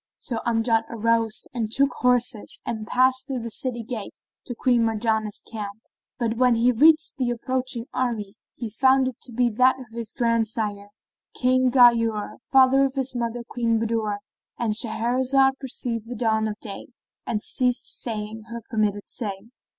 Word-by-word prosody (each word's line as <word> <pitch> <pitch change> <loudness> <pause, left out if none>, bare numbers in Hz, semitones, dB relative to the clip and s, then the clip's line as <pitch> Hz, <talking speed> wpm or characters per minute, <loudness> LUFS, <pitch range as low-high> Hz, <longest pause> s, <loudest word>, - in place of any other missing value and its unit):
So 235 -3 -4
Amjad 225 -1 +2
arose 230 -1 0
and 225 -3 -2
took 275 +4 +4
horse 250 0 +3 0.3
and 220 -2 -4
passed 260 +1 +2
through 260 -4 -3
the 230 - -5
city 245 -2 -3
gate 225 -3 -6 0.3
to 245 - -5
Queen 245 -1 +2
Marjanah's 220 -1 -1
camp; 210 -2 -7 0.4
but 230 -2 -1
when 250 -1 +4
he 235 +2 +3
reached 310 +7 +4
the 255 -3 0
approaching 250 0 -2
army 225 -6 -2 0.2
he 230 -3 -6
found 265 +3 +3
it 255 - -6
to 245 - -4
be 245 +1 +2
that 255 +4 +3
of 260 - -9
his 230 -2 -6
grand 230 -2 +1
sire, 205 -2 -3 0.5
King 255 0 +3
Ghayur, 230 -4 +4
father 270 0 +5
of 270 0 -3
his 265 -1 -1
mother 235 -1 -3
Queen 230 -2 0
Budur.—And 220 0 -3
Shahrazad 255 +4 +1
perceived 240 -4 -4
the 245 - -5
dawn 220 -1 +1
of 215 0 -5
day 200 -4 -8 0.4
and 210 -2 -2
ceased 250 -1 +2 0.2
saying 220 -1 -3
her 235 -1 -7
permitted 210 -2 0
say. 205 -1 -5
235 Hz, 160 wpm, -24 LUFS, 220-255 Hz, 0.5 s, father